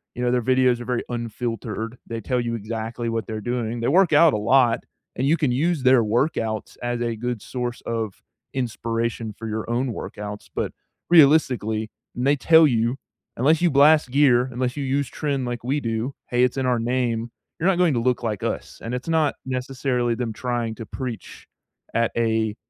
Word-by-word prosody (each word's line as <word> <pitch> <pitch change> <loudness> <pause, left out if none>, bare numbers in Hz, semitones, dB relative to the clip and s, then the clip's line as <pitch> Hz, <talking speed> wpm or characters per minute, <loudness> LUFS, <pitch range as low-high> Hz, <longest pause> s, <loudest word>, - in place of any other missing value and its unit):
you 125 - -4
know, 120 - +2
their 125 0 +2
videos 130 -1 +3
are 120 - -7
very 125 -1 -1
unfiltered, 115 -1 -4
they 115 -1 -5
tell 125 +4 -1
you 120 -1 -2
exactly 115 +2 -4
what 115 -1 -2
they're 110 -2 -4
doing, 120 0 -2
they 115 - 0
work 175 +3 +4
out 155 0 +6
a - - +1
lot, 120 +1 +3 0.3
and 130 - 0
you 155 - +4
can 150 -5 +1
use 150 +3 0
their 130 -2 +5
workouts 110 -1 -1
as 120 0 -2
a 120 -1 -1
good 120 0 -3
source 125 -1 -4
of 110 -4 -3 0.3
inspiration 115 -2 -2
for 115 - -6
your 110 +1 -4
own 120 +1 0
workouts, 105 0 -7
but, - - -2 0.4
realistically, 130 -9 +4 0.2
and 125 - -2
they 145 - +5
tell 160 +3 +6
you, 120 0 +1 0.4
"Unless 155 +7 +3
you 175 - +4
blast 145 +1 +5
gear, 130 -3 +4
unless 125 0 -2
you 145 - -2
use 135 +1 0
tren 140 -4 -2
like 120 -1 -4
we 135 +4 0
do- 115 +1 -3 0.2
hey, 125 0 +3
it's 125 +1 +1
in 135 - 0
our 125 -2 +2
name- 120 -1 -1 0.3
you're 165 - +1
not 190 - +2
going 175 -4 +3
to 120 - +1
look 125 0 0
like 105 -4 -2
us," - - -4
and 115 +2 -3
it's 125 +4 -6
not 160 -3 +2
necessarily 130 -2 -1
them 115 -2 -3
trying 120 -1 -2
to 115 - -8
preach 125 -6 -7 0.5
at 115 0 +1
a, 110 -2 +1
120 Hz, 195 wpm, -23 LUFS, 115-135 Hz, 0.5 s, out